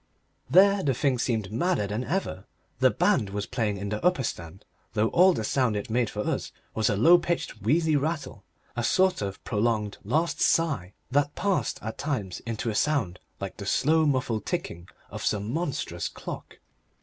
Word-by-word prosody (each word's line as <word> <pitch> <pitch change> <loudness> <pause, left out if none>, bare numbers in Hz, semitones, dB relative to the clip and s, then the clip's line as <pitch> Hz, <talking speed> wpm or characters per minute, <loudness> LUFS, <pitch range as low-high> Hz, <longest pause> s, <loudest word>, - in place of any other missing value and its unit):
There 200 +2 +6
the 135 -6 +1
thing 130 -1 +1
seemed 110 -6 -1
madder 150 - +1
than 105 +4 -3
ever. 160 - -3 0.3
The - - +6
band 100 - +2
was 100 +1 -3
playing 110 -5 -1
in 100 +1 -4
the 105 +5 -3
upper 180 -6 +3
stand, 85 -3 -6 0.3
though 110 0 +2
all 185 +2 +6
the 115 - -2
sound 125 0 +1
it 105 +2 -4
made 120 -1 +1
for 105 - -4
us - - -2 0.2
was 110 -1 +1
a 105 - +1
low 165 - +6
pitched, 170 -9 -3
wheezy 155 - +2
rattle, 155 +2 -2 0.3
a 120 - -1
sort 185 - +3
of 100 -1 -5
prolonged 105 -1 -1
last 155 +11 0
sigh 135 - +1 0.2
that 145 +2 +1
passed 200 -2 0
at 110 +1 -5
times 105 - -3
into 115 0 -2
a - - -4
sound 110 -9 0 0.2
like 100 -1 -6
the 100 - -7
slow, 155 +6 +3
muffled 130 -6 0
ticking 85 +1 -4 0.2
of - - -6
some 105 +3 -1
monstrous 160 -3 -2
clock. - - -8
120 Hz, 180 wpm, -27 LUFS, 105-155 Hz, 0.3 s, There